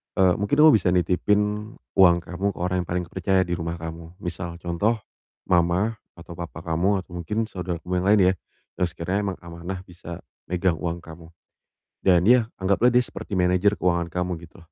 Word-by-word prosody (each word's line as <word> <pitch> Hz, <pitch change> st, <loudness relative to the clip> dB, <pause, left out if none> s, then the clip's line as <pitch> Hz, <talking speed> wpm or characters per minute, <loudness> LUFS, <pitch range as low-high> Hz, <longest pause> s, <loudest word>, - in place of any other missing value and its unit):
Eee, 95 Hz, -2 st, +4 dB
mungkin 100 Hz, +5 st, 0 dB
kamu 155 Hz, 0 st, +9 dB
bisa 90 Hz, -4 st, +2 dB
nitipin 105 Hz, +4 st, +1 dB, 0.2 s
uang 90 Hz, -3 st, +7 dB
kamu 90 Hz, +3 st, -5 dB
ke -, -, -10 dB
orang 90 Hz, +1 st, 0 dB
yang -, -, -27 dB
paling 90 Hz, 0 st, -1 dB
terpercaya 95 Hz, +2 st, +1 dB
di 90 Hz, -, -3 dB
rumah 85 Hz, -1 st, -3 dB
kamu. 80 Hz, +1 st, -8 dB
Misal, 85 Hz, -1 st, -5 dB
contoh, 90 Hz, +7 st, +1 dB, 0.5 s
mama 90 Hz, +6 st, +2 dB, 0.2 s
atau 85 Hz, 0 st, -11 dB
papa 85 Hz, -1 st, -7 dB
kamu 90 Hz, +4 st, +1 dB
atau 90 Hz, -, -24 dB
mungkin 105 Hz, +6 st, -2 dB
saudara 90 Hz, -2 st, -4 dB
kamu 90 Hz, -, -4 dB
yang -, -, -1 dB
lain 105 Hz, +1 st, +6 dB
ya, -, -, -2 dB, 0.5 s
yang 90 Hz, -, +3 dB
sekiranya 85 Hz, +4 st, -2 dB
emang 95 Hz, -, -3 dB
amanah 85 Hz, +2 st, -6 dB
bisa 85 Hz, -2 st, -9 dB, 0.3 s
megang 90 Hz, 0 st, +1 dB
uang 85 Hz, +1 st, -3 dB
kamu, 80 Hz, 0 st, -12 dB, 0.8 s
dan 90 Hz, -2 st, +5 dB
ya 120 Hz, -2 st, +5 dB
anggaplah 100 Hz, +6 st, +3 dB
dia 125 Hz, -, +5 dB
seperti -, -, -9 dB
manajer 90 Hz, +3 st, +3 dB
keuangan 85 Hz, -1 st, +1 dB
kamu 90 Hz, -2 st, -2 dB
gitu. -, -, -19 dB
90 Hz, 185 wpm, -24 LUFS, 85-100 Hz, 0.8 s, kamu